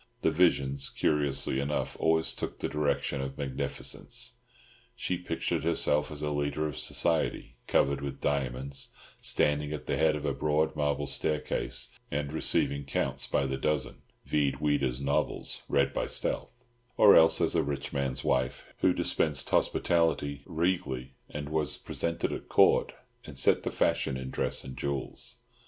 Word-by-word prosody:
The -, -, +4 dB
visions, 70 Hz, -5 st, +2 dB
curiously 70 Hz, -2 st, +1 dB
enough, 70 Hz, +2 st, -1 dB
always 80 Hz, 0 st, +2 dB
took -, -, -5 dB
the -, -, -2 dB
direction 75 Hz, -1 st, 0 dB
of 65 Hz, 0 st, -5 dB
magnificence. 70 Hz, -3 st, -4 dB, 0.6 s
She 90 Hz, -, -1 dB
pictured 85 Hz, -1 st, -2 dB
herself 75 Hz, -2 st, +2 dB
as 75 Hz, 0 st, -5 dB
a 75 Hz, -, 0 dB
leader 75 Hz, +1 st, -1 dB
of 75 Hz, -3 st, -3 dB
society, 80 Hz, +3 st, 0 dB
covered 70 Hz, 0 st, +2 dB
with 70 Hz, -1 st, -5 dB
diamonds, 70 Hz, -1 st, -2 dB, 0.3 s
standing 75 Hz, 0 st, +1 dB
at 75 Hz, -, -6 dB
the -, -, -1 dB
head 80 Hz, -1 st, +3 dB
of 75 Hz, 0 st, -4 dB
a 70 Hz, -, +1 dB
broad 75 Hz, +2 st, +1 dB
marble 75 Hz, -1 st, 0 dB
staircase 75 Hz, +2 st, -1 dB, 0.2 s
and 70 Hz, +1 st, -2 dB
receiving 70 Hz, -2 st, +1 dB
Counts 70 Hz, -, -2 dB
by 70 Hz, -, +1 dB
the 65 Hz, 0 st, -2 dB
dozen 75 Hz, -1 st, -1 dB, 0.2 s
(vide 70 Hz, -3 st, +1 dB
Ouida's 70 Hz, -4 st, +1 dB
novels, 70 Hz, +1 st, -1 dB
read 70 Hz, 0 st, +2 dB
by -, -, -1 dB
stealth); 125 Hz, +1 st, -3 dB, 0.3 s
or 100 Hz, -, +8 dB
else 80 Hz, 0 st, +6 dB
as -, -, +2 dB
a -, -, +3 dB
rich 70 Hz, 0 st, -3 dB
man's 70 Hz, -2 st, -2 dB
wife 65 Hz, -1 st, 0 dB
who -, -, +4 dB
dispensed 75 Hz, -4 st, -1 dB
hospitality 80 Hz, -4 st, +1 dB
regally, 80 Hz, -7 st, -1 dB, 0.2 s
and 75 Hz, 0 st, -5 dB
was 75 Hz, -1 st, +1 dB
presented 85 Hz, 0 st, -2 dB
at -, -, -7 dB
Court, -, -, +5 dB, 0.3 s
and 70 Hz, -, -9 dB
set 65 Hz, -, +4 dB
the -, -, -2 dB
fashion 65 Hz, -, +1 dB
in 65 Hz, 0 st, -6 dB
dress -, -, -1 dB
and 65 Hz, -, -8 dB
jewels. 70 Hz, -2 st, -4 dB
70 Hz, 155 wpm, -30 LUFS, 70-75 Hz, 0.6 s, or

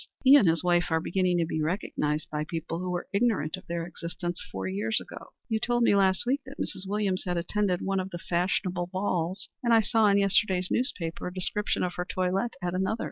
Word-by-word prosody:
He 270 Hz, +1 st, +9 dB
and 230 Hz, -10 st, +6 dB
his 165 Hz, +1 st, +2 dB
wife 175 Hz, -1 st, +3 dB
are 160 Hz, -1 st, +2 dB
beginning 180 Hz, +1 st, +1 dB
to 170 Hz, -, +2 dB
be 160 Hz, -1 st, -2 dB
recognized 155 Hz, -3 st, -1 dB
by 150 Hz, 0 st, -1 dB
people 165 Hz, +1 st, -4 dB
who 180 Hz, 0 st, -3 dB
were 175 Hz, -1 st, -3 dB
ignorant 200 Hz, -8 st, +1 dB
of 185 Hz, -, -14 dB
their 170 Hz, -1 st, -2 dB
existence 175 Hz, 0 st, -5 dB
four 95 Hz, 0 st, -4 dB
years 105 Hz, +4 st, 0 dB
ago. -, -, -10 dB, 0.2 s
You 220 Hz, -, 0 dB
told 240 Hz, +1 st, +1 dB
me 235 Hz, -, +5 dB
last 190 Hz, 0 st, +3 dB
week 270 Hz, +4 st, +1 dB
that 270 Hz, -, -10 dB
Mrs. 190 Hz, +1 st, -3 dB
Williams 200 Hz, -2 st, 0 dB
had 175 Hz, -1 st, 0 dB
attended 180 Hz, +1 st, 0 dB
one 195 Hz, 0 st, 0 dB
of 185 Hz, 0 st, -3 dB
the 175 Hz, -, -6 dB
fashionable 175 Hz, +1 st, -1 dB
balls, 185 Hz, 0 st, -2 dB
and 235 Hz, -2 st, +4 dB
I 225 Hz, -, +6 dB
saw 220 Hz, 0 st, +3 dB
in 200 Hz, 0 st, +4 dB
yesterday's 195 Hz, -2 st, +2 dB
newspaper 180 Hz, -13 st, -1 dB
a -, -, -4 dB
description 200 Hz, +3 st, -1 dB
of 180 Hz, -1 st, -1 dB
her 180 Hz, -, -2 dB
toilette 190 Hz, +6 st, -1 dB
at 175 Hz, 0 st, -1 dB
another. 190 Hz, +4 st, 0 dB
185 Hz, 220 wpm, -28 LUFS, 170-200 Hz, 0.2 s, He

